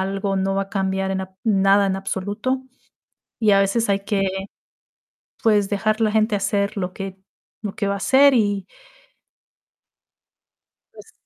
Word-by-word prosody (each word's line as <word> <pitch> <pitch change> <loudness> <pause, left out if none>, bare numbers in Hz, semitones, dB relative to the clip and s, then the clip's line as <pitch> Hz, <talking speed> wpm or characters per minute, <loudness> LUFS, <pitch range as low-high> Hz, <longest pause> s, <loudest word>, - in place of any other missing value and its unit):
algo, 195 +1 -2
no 195 0 0
va 195 - +1
a 195 - -9
cambiar 190 -1 -1
en 190 0 -1
ab 190 0 -7
nada 200 -2 +4
en 190 -1 0
absoluto, 205 +7 -3 0.8
y 220 -2 +3
a 195 - +5
veces 200 +4 +1
hay 200 0 +2
que, 195 -1 0 1.1
pues, 210 -3 +3
dejar 215 +2 0
la 220 -1 +3
gente 215 0 +2
hacer 200 0 -1
lo 185 -2 -3
que 195 0 -7 0.4
lo 205 -2 -4
que 200 - -2
va 200 - 0
a - - -3
hacer 270 +7 +5
y. 205 -5 +1 2.3
Pues. - - -15
200 Hz, 155 wpm, -22 LUFS, 195-215 Hz, 2.3 s, a